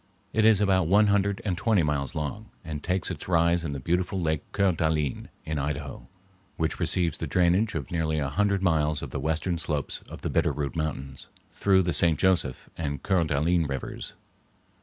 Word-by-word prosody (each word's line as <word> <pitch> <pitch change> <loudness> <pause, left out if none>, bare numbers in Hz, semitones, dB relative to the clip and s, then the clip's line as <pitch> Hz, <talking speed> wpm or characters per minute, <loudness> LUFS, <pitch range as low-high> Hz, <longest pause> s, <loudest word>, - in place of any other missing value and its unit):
It 110 -1 +3
is 110 -2 +5
about 95 -4 +3
one 105 +4 +5
hundred 100 0 0
and 95 -4 0
twenty 105 -1 +2
miles 70 -3 -1
long, 100 +9 -4 0.2
and 75 -2 -5
takes 90 +2 -1
its - - -6
rise 85 -1 +3
in 75 -3 -3
the 70 - -4
beautiful 90 +7 -1
Lake 80 -3 0
Coeur 100 -1 +2
d'Alene, 80 -4 -1 0.2
in 80 -1 -2
Idaho, 70 -4 -4 0.5
which 80 -1 -1
receives 85 -4 +1
the - - -3
drainage 90 +4 +2
of 70 -5 -4
nearly 80 -2 0
a 70 -2 0
hundred 100 +4 +1
miles 75 -4 +1
of 70 - -6
the - - -3
western 80 +2 -1
slopes 75 -3 -3
of - - -9
the - - -1
Bitter - - +2
Root 70 -3 -3
Mountains, 70 -4 -4 0.2
through 95 -2 +3
the 90 -1 0
St. 80 0 +3
Joseph 85 -9 +1
and 70 -4 -4
Coeur 95 -4 +2
d'Alene 80 +3 +1
Rivers. 70 -2 -5
80 Hz, 190 wpm, -27 LUFS, 75-95 Hz, 0.5 s, is